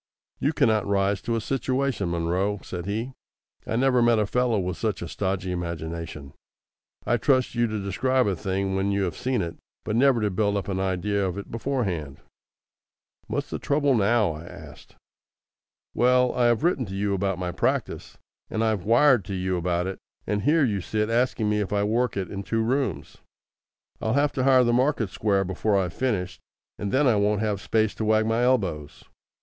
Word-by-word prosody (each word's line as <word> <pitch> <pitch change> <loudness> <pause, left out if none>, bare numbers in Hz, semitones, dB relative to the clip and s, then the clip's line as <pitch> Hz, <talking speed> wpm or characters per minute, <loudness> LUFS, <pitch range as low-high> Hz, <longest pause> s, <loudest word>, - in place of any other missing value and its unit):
"You 145 - +1
cannot 110 -9 +2
rise 100 -1 +1
to 115 - -2
a - - 0
situation, 130 -4 -1
Munro," 90 +5 0
said 90 0 -6
he. 115 +6 -3 0.5
"I - - -1
never 125 0 +3
met 120 -1 +4
a 105 - +2
fellow 125 +1 +1
with 90 -1 -2
such 105 -6 -2
a - - -5
stodgy 95 0 -2
imagination. 85 -4 -5 0.7
I'd 120 -1 +1
trust 130 -3 +2
you 120 0 +1
to 110 -1 -3
describe 130 +7 +1
a 100 - 0
thing 95 +2 -2
when 95 +1 0
you 100 0 0
have 85 -4 -2
seen 125 -4 -1
it, 85 -1 -6 0.3
but 105 - -2
never 130 0 +4
to 105 -1 0
build 100 +2 +1
up 100 - -4
an 95 -1 -1
idea 95 +2 0
of 95 0 -2
it 100 - -7
beforehand." 100 - -2 1.1
"What's - - -3
the - - -3
trouble 145 -1 +1
now?" 110 -3 +3
I 80 +2 -8
asked. - - -13 1.0
"Well, 125 +1 +3
I 120 -1 +2
have 120 +3 +2
written 155 - +1
to 95 - -6
you 100 0 0
about 95 -1 -1
my 90 -1 -3
practice, - - -2 0.3
and 110 - -1
I've 110 -5 0
wired 120 +1 +5
to 95 - -4
you 95 0 -1
about 90 0 -1
it, 95 0 -5 0.3
and 105 0 -1
here 155 +4 +3
you 100 -5 -1
sit 105 +3 -1
asking 120 -2 +1
me 105 0 +1
if 100 -1 -2
I 100 0 +1
work 115 +2 0
it 95 -2 -3
in 100 - -4
two 115 +3 -1
rooms. 120 - -2 0.8
I'll 110 - 0
have 145 +2 +2
to 130 - -1
hire 130 -2 +6
the 120 -1 +2
market 125 -5 +1
square 100 -2 +1
before 100 +2 0
I've 90 -3 -1
finished, 100 -9 -2 0.4
and 100 -1 -3
then 140 +3 +3
I 120 -5 +4
won't 105 0 +1
have 105 -3 -1
space 110 -1 +1
to 110 - -3
wag 110 0 +3
my 115 +2 +1
elbows. 95 - 0
105 Hz, 195 wpm, -25 LUFS, 95-120 Hz, 1.1 s, hire